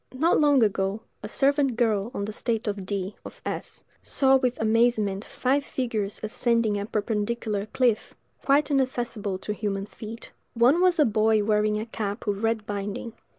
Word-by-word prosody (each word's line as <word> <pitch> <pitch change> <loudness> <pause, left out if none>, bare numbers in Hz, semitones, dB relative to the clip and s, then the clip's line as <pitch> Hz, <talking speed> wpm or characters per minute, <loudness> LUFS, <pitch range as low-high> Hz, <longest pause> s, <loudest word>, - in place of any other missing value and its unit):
Not 320 +6 +3
long 290 -4 +5
ago, 195 0 0 0.2
a 210 - -6
servant 275 0 +2
girl 220 -3 +1
on 200 - -2
the 215 - -4
estate 225 +1 -2
of 200 -2 -3
D——, 195 0 -3
of - - -11
S——, - - -5 0.2
saw 270 -1 +3
with 255 -2 +1
amazement 220 -3 +2
five 270 +4 0
figures 220 -7 -3
ascending 225 -1 +1
a 200 - -4
perpendicular 210 -1 -2
cliff, 240 -2 0 0.3
quite 285 +1 +3
inaccessible 240 -7 -1
to 210 +2 -4
human 200 -2 -3
feet; 225 +2 -9 0.2
one 250 +9 +4
was 365 -1 +4
a 300 - +5
boy 215 -1 +3
wearing 210 0 +1
a 215 - -4
cap 205 -3 -4
with 200 -1 -1
red 225 -1 0
binding. 205 +3 -4
220 Hz, 165 wpm, -26 LUFS, 205-250 Hz, 0.3 s, long